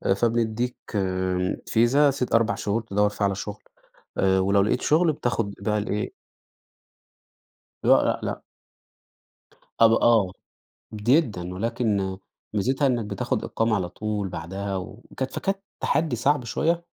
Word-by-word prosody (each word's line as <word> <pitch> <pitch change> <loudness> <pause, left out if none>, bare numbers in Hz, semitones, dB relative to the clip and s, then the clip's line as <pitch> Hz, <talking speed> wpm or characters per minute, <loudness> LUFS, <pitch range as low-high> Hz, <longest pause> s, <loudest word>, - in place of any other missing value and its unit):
فبنديك 120 +2 0 0.2
آآ، 95 -1 0
فيزا 135 +6 +4
ست 125 -3 -1
4 115 0 +3
شهور 110 +2 -1
تدوّر 105 -1 +1
فيها 105 0 -1
على 100 -1 0
شغل. 105 +1 -7 0.5
آآ، 95 0 +3
ولو 100 +1 +3
لقيت 105 - +1
شغل 160 +1 +3
بتاخد 115 -6 -2
بقى 105 +2 0
الإيه 105 0 -2 1.7
لأ، - - +5
لأ، - - 0
لأ. - - -3 1.4
أب 115 - +8
آه، 115 -4 +4 0.6
جدًا، 105 - +1
ولكن 100 -3 -1 0.4
ميزتها 130 +7 +1
إنك 120 -4 0
بتاخد - - -2
إقامة 115 0 0
على 90 -3 -1
طول، 105 0 -3
بعدها 95 +5 -4
وكت 120 +7 -6
فكانت 195 0 -1 0.2
تحدي 150 -3 +1
صعب 140 +3 +1
شوية. 165 +9 0
110 Hz, 125 wpm, -25 LUFS, 100-120 Hz, 1.7 s, أب